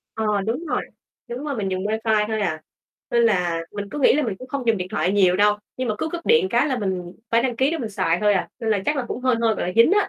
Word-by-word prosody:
Ờ, 220 - -2 0.2
đúng 250 +10 -2
rồi, - - -1 0.5
đúng 245 +4 -5
rồi, 285 -4 -3
mình 200 -3 -2
dùng 185 +1 -2
WiFi 220 0 +1
thôi 220 -1 -1
à. 160 -5 -2 0.5
Nên 235 0 +3
là 180 -7 +2
mình 205 -1 -5
cứ 295 - -5
nghĩ 275 - +5
là 300 - +2
mình 220 -8 -2
cũng 255 - -10
không 275 -3 -4
dùng 225 -2 +3
điện 180 -1 -4
thoại 185 - 0
nhiều 185 -3 +4
đâu. 210 +1 +4 0.2
Nhưng 255 -1 -2
mà 215 - 0
cứ - - -1
cúp 340 +1 -6
điện 465 -5 +4
cái 240 +5 +3
là 260 -4 -1
mình 185 -4 -3 0.2
phải 230 0 +3
đăng 245 -3 -1
ký 265 +4 +2
để 330 - -2
mình 225 -5 -4
xài 180 -4 0
thôi 210 -1 +4
à. 190 - -1
Nên 225 -1 -1
là 205 - +3
chắc 300 - +1
là 260 - -1
cũng 250 - -4
hơi 255 -2 +3
hơi, 225 -2 +2
gọi - - -3
là, 180 - -2
dính 230 +11 +6
á. 415 0 +3
225 Hz, 305 wpm, -22 LUFS, 200-255 Hz, 0.5 s, dính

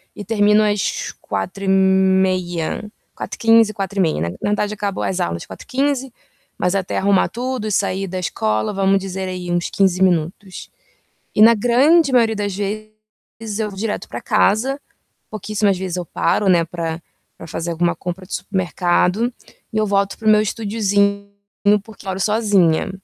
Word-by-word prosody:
e 205 - -7
termino 210 0 +3
às 205 -2 -1
16:30. 190 - +1 0.3
16:15, 225 -1 +3
16:30. 195 - -1
Na 85 - -1
na 90 - -9
verdade, 210 0 0
acabam 205 -2 -3
as 185 - -1
aulas 85 0 -2
16:15, 265 - -2 0.4
mas 180 0 0
até 190 -2 -2
arrumar 195 -1 +3
tudo, 245 -2 -3
sair 195 0 0
da 185 0 -5
escola, 110 - -1
vamos 195 0 +2
dizer 190 0 -5
aí 180 -1 -5
uns 175 0 0
15 190 -2 +1
minutos. 185 +1 -1 0.7
E 210 - +4
na 230 - +9
grande 270 +8 +4
maioria 230 -3 +3
das 205 -1 -2
vezes 215 +1 -7
eu 215 - -1
vou 195 - -11
direto 215 +1 -3
pra - - -6
casa. 230 +5 +1 0.5
Pouquíssimas 210 -2 0
vezes 185 -1 -4
eu 180 - -3
paro, 200 +5 0
né, 175 -2 +4
pra 165 -1 -4 0.4
pra 165 - -10
fazer 165 +1 -4
alguma 170 +1 +1
compra 180 +1 -6
de 185 - -10
supermercado 180 +2 0 0.5
e - - -1
eu 215 - +2
volto 200 -1 0
para 225 - -12
o 215 - +6
meu 210 - +5
estudiozinho, 200 -2 0 0.5
porque 220 -2 -15
moro 190 -1 -2
sozinha. 200 -4 +2
195 Hz, 155 wpm, -19 LUFS, 180-215 Hz, 0.7 s, na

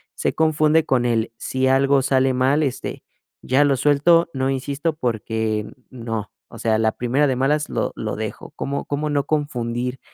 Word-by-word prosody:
se - - -1
confunde 155 0 +3
con 125 -2 +1
el, 115 -1 0
si 130 0 -1
algo 135 +1 +3
sale 130 0 +2
mal, 135 +4 +2
este, 135 -4 -4 0.4
ya 135 +3 +3
lo 140 -2 +2
suelto, 155 +5 +4
no 130 0 -1
insisto, 140 +4 -2
porque 110 -4 -2 0.2
no. 115 -4 -5 0.2
O - - -11
sea, 110 -1 +1
la 110 0 +2
primera 130 +5 +1
de 130 - 0
malas 145 +3 +1
lo - - -1
lo - - -4
dejo, - - -6
¿cómo 140 +1 -3
cómo 150 +1 -2
no 140 -1 0
confundir, 125 -4 -2
135 Hz, 170 wpm, -21 LUFS, 120-145 Hz, 0.4 s, suelto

